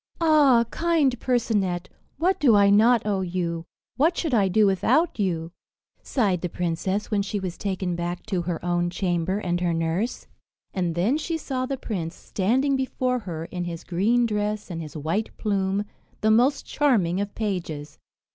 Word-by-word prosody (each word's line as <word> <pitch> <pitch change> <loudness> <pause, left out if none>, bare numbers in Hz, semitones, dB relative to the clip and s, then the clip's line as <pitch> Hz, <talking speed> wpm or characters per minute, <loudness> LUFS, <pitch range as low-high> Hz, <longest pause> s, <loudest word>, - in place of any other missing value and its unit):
"Ah! 295 -8 +5
kind 315 -8 +1
Percinet, 200 -8 0 0.3
what 360 +6 +1
do 245 -7 +5
I 200 -1 +5
not 225 +3 +5
owe 200 -2 0
you? 170 -2 -2 0.3
What 320 +6 +3
should 320 -6 -1
I 205 -4 +4
do 210 +3 +4
without 205 - +2
you!" 170 -4 -1 0.5
sighed 200 - 0
the 180 - -2
princess, 180 +5 -2
when 205 -2 +2
she 200 +1 -3
was 185 -2 -4
taken 185 -3 -2
back 175 +1 -4
to 190 -5 -1
her 170 -1 -4
own 175 0 +1
chamber 180 0 -1
and 175 -4 -1
her 170 -2 +1
nurse. 165 +8 -1 0.5
And 175 -3 -1
then 220 - +1
she 325 +1 -2
saw 255 -4 -3
the 275 0 -2
prince 175 -9 -4
standing 260 +8 0
before 255 -1 -1
her, 165 -6 -6
in 175 +1 -5
his 170 -1 -6
green 220 +7 +2
dress 210 -2 -2
and 165 -1 -4
his 155 -1 -8
white 165 +9 -2
plume, 200 -1 0 0.4
the 220 - +3
most 255 +6 +3
charming 200 - +1
of 205 0 -5
pages. 165 -9 -4
200 Hz, 170 wpm, -25 LUFS, 175-240 Hz, 0.5 s, Ah